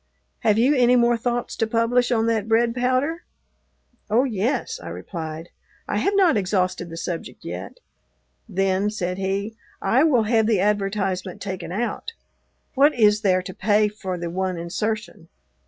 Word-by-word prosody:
"Have 210 - +2
you 255 +6 +4
any 250 -2 +4
more 240 -1 +4
thoughts 240 +1 -2
to 225 - +1
publish 235 +2 +1
on 225 -2 +2
that 225 -2 0
bread 230 +1 +3
powder?" 255 +7 0 0.9
"Oh, 230 +4 +4
yes," 245 +1 -1
I 85 - -9
replied, 160 - -6 0.4
"I - - 0
have 395 - +1
not 365 - +4
exhausted 185 -2 -1
the 165 - -8
subject 165 0 -6
yet." - - -6 0.8
"Then," 195 +1 +1
said 180 -3 -3
he, 200 +3 -2 0.2
"I 260 +5 +3
will 265 -8 +4
have 220 0 +2
the 220 -4 +2
advertisement 195 -2 -1
taken 185 -4 -5
out. 235 - -3 0.6
What 285 +3 +4
is 210 -3 +4
there 185 -3 +2
to 185 - -7
pay 210 +2 +2
for 190 -3 -5
the 170 -1 -4
one 185 0 -2
insertion?" 180 0 -4
210 Hz, 155 wpm, -23 LUFS, 185-240 Hz, 0.9 s, you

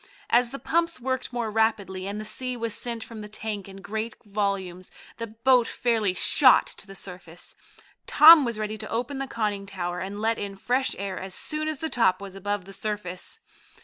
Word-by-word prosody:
As 240 0 +5
the 275 - -6
pumps 335 +1 0
worked 260 +1 -2
more 235 -3 -2
rapidly, 205 -4 0
and 205 +1 -4
the 215 - -5
sea 255 +3 -2
was 230 -2 -3
sent 235 -2 -3
from 225 -2 -10
the 210 - -7
tank 210 -2 -5
in 195 0 -11
great 220 +2 -4
volumes, 195 -3 -2 0.3
the 230 - -4
boat 235 +2 +3
fairly 220 -6 0
shot 255 +6 +6
to - - -8
the 195 - -11
surface. 180 -3 -8 0.5
Tom 315 0 +9
was 235 -3 -2
ready 215 0 -3
to 215 - -6
open 250 +4 -2
the 270 - -3
conning 210 -5 -2
tower 180 -2 -4
and 195 +2 -5
let 225 +1 +1
in 200 -1 -4
fresh 250 +6 0
air 195 0 -4
as 190 0 -7
soon 310 0 -3
as 310 -1 -2
the 320 - -1
top 185 -7 +3
was 200 -1 -8
above 200 0 -3
the 195 - -11
surface. 210 - -4
215 Hz, 200 wpm, -26 LUFS, 195-245 Hz, 0.5 s, Tom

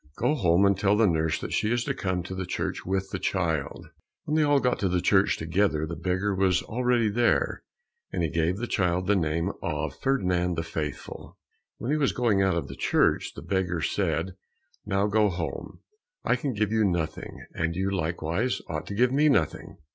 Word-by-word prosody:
Go 125 +6 +2
home 95 - +3
and 100 0 +4
tell 100 +2 +2
the 110 - +5
nurse 80 -4 +1
that - - -5
she 105 - +1
is 120 0 +1
to - - -1
come 90 -2 -2
to 90 - -7
the 95 -1 -4
church - - -3
with 95 0 -1
the - - -3
child." 80 -7 -2 0.4
When 150 - -3
they 155 - +4
all 145 -1 +4
got 125 -2 0
to 95 - +1
the 90 0 +1
church 95 +2 +3
together, 80 -1 0
the 85 +1 -5
beggar 90 +4 -1
was 95 -1 +2
already 125 -1 +1
there, 120 +3 +1 0.5
and - - -1
he 80 - +1
gave 85 +3 0
the 120 - -3
child 90 -5 0
the 105 +2 +3
name 85 +1 0
of 75 -3 -3
Ferdinand 90 -10 +1
the 80 - -2
Faithful. 80 -3 -6 0.4
When 120 - -3
he 155 - +2
was 145 -3 +1
going 115 -5 +2
out 95 -3 +2
of 85 - -3
the - - -8
church, - - +1
the 70 - -8
beggar 90 -1 -1
said, 85 0 -1 0.5
"Now 100 0 +1
go 105 0 +3
home, 85 -2 -5 0.4
I - - +2
can 140 -5 -2
give 105 0 0
you 110 -1 +2
nothing, 85 -5 -2
and 85 0 -2
you 95 +2 -1
likewise 85 +6 -1
ought 80 -1 -4
to 100 - -5
give 125 +3 +3
me 150 +3 +4
nothing." 140 - 0
95 Hz, 205 wpm, -27 LUFS, 85-110 Hz, 0.5 s, the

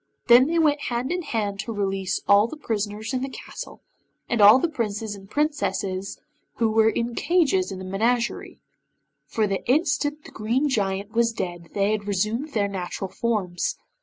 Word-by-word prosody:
Then 245 +3 +8
they 335 +2 0
went 300 -3 +3
hand 245 +3 -2
in 360 0 -1
hand 210 - -2
to 230 - -4
release 195 -3 -1
all 205 +2 +6
the 310 - -8
prisoners 215 -3 -3
in 255 - 0
the 270 - -3
castle, - - -9 0.5
and 235 -3 0
all 205 +4 +9
the 305 - +1
Princes 220 -7 -3
and 195 -1 -12
Princesses 205 -10 -1 0.4
who 225 -2 +1
were 220 0 +4
in 235 +1 -2
cages 360 +5 +2
in 190 - -5
the 185 - -7
menagerie, 230 +5 -1 0.6
for 220 - 0
the 195 -1 -2
instant 295 +1 +1
the - - -11
Green 235 +7 0
Giant 200 -5 -1
was 230 0 +2
dead 175 -6 -5
they 200 0 +2
had 210 -1 -2
resumed 215 +9 -1
their 205 -2 +1
natural 190 0 -5
forms. 205 -7 -1
220 Hz, 175 wpm, -24 LUFS, 200-260 Hz, 0.6 s, all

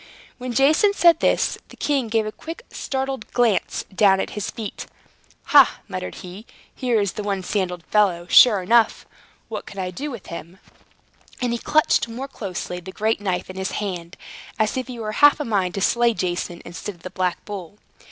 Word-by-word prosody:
When 250 0 -4
Jason 305 - +4
said 340 -3 +5
this, - - +1
the - - -15
king 275 -5 0
gave 220 0 +1
a 215 - -3
quick 330 - -9
startled 265 -3 -4
glance 240 -5 +1
down 195 0 +4
at - - -2
his 210 -1 -4
feet. 220 -3 -6 0.7
"Ha!" - - +7
muttered 90 - -5
he, 190 +6 -10 0.3
"here 245 -4 +1
is 200 -3 0
the - - -4
one 200 -2 -2
sandaled 180 -3 -2
fellow, 185 -5 +2
sure 205 +1 +7
enough! 230 +3 +3 0.4
What - - -6
can 200 - -11
I 185 -1 -3
do 285 +11 -5
with 235 -8 -8
him?" 170 +2 -8 0.8
And 245 -2 0
he 235 - -2
clutched 305 -3 +2
more 245 +4 -6
closely 185 -7 -5
the 185 +2 -9
great 220 +2 0
knife 185 -3 -2
in 185 - -9
his 190 0 -3
hand, 180 -4 -4 0.4
as 215 -1 +1
if 255 -2 -3
he 250 -2 -7
were 215 -2 -4
half 290 +7 +5
a 295 - -2
mind 195 -5 0
to 195 - -2
slay 235 +3 +3
Jason, 175 -1 -3
instead 175 +4 -7
of 170 - -23
the 185 - -7
black 185 -2 -2
bull. 200 -2 -7
210 Hz, 190 wpm, -22 LUFS, 185-240 Hz, 0.8 s, Ha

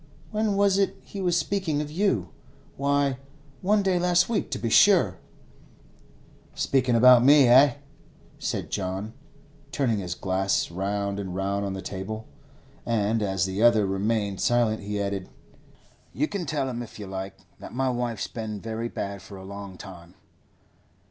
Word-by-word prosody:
When 215 -1 0
was 200 -1 +3
it 195 0 +1
he 200 - -7
was 175 -2 +2
speaking 170 -3 -1
of 150 0 -4
you? 150 - 0 0.5
Why, 140 -1 +1 0.4
one 205 +2 +2
day 185 -2 +2
last 175 0 +3
week, 220 -4 -1
to - - -3
be 115 +2 -3
sure.' 170 - +5 1.4
'Speakin' 130 -3 +1
about 125 +1 +7
me, 140 0 +7
eh?' 130 +3 +6 0.6
said - - -3
John, 95 +2 -3 0.6
turning 120 -7 0
his 90 -2 -4
glass 95 -1 0
round 100 +2 -2
and 95 -3 -5
round 100 +1 -1
on 95 - -3
the 95 0 -6
table. 105 +4 -5 0.6
And 110 -1 0
as 95 -2 0
the 95 +2 -3
other 115 -3 +5
remained 100 +1 -1
silent, 120 -2 +2
he 105 0 -4
added, 100 -2 -3 0.8
'You 150 +5 0
can 190 -4 -4
tell 140 -2 -1
him, 120 -2 -4
if 120 - -9
you 105 - -7
like, 95 0 -6 0.2
that - - -9
my 130 +1 0
wife's 120 -3 -2
been 110 -3 -5
very 115 +2 -4
bad 100 -3 -5
for 100 - -11
a 95 - -10
long 100 -1 -8
time. 90 -1 -12
110 Hz, 160 wpm, -26 LUFS, 100-145 Hz, 1.4 s, about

